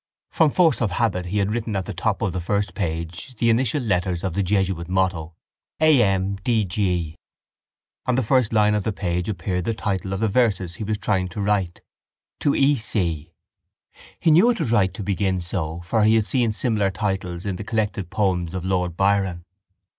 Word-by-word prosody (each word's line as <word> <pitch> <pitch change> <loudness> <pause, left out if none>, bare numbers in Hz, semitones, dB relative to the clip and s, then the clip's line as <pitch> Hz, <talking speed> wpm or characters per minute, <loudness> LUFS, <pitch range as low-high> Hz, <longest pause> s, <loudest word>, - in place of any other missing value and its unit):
From 160 - +4
force 160 -6 +3
of 110 - +2
habit 90 -4 0
he 100 +4 -2
had 100 +1 +1
written 115 -2 -3
at 95 -1 -1
the - - -5
top 100 +5 -1
of 100 -6 -1
the 90 - -2
first 100 +1 -1
page 85 +5 -4
the 115 +1 +2
initial 125 +3 +1
letters 90 -5 -1
of 95 -3 -2
the 100 - 0
jesuit 95 -3 0
motto: 90 -4 -1 0.4
A.M.D.G. 100 - +1 0.9
On 125 - +2
the 130 - +1
first 125 0 +2
line 105 -1 +3
of 105 -2 0
the 110 - -1
page 90 -1 -2
appeared 90 -1 -2
the 115 +4 -1
title 95 -3 -2
of 95 - -2
the 110 - +1
verses 100 -6 +1
he - - -5
was 105 0 -1
trying 95 -2 0
to 90 +3 -8
write: 100 -4 0 0.6
To 145 - +1
E—— 140 +1 +3
C——. 85 -8 -2 0.9
He 165 - +3
knew 180 +10 +6
it 235 - 0
was 115 - -1
right 100 -5 +3
to 105 - -7
begin 95 -1 0
so 85 -2 -4
for 105 +6 +1
he 110 +1 +5
had 110 -2 +2
seen 120 -2 +1
similar 110 -3 0
titles 95 -2 -3
in 95 -3 -2
the - - -6
collected 105 -4 -2
poems 95 -3 -1
of 90 -1 -4
Lord 90 -2 -1
Byron. 95 -3 +1
100 Hz, 190 wpm, -23 LUFS, 90-110 Hz, 0.9 s, knew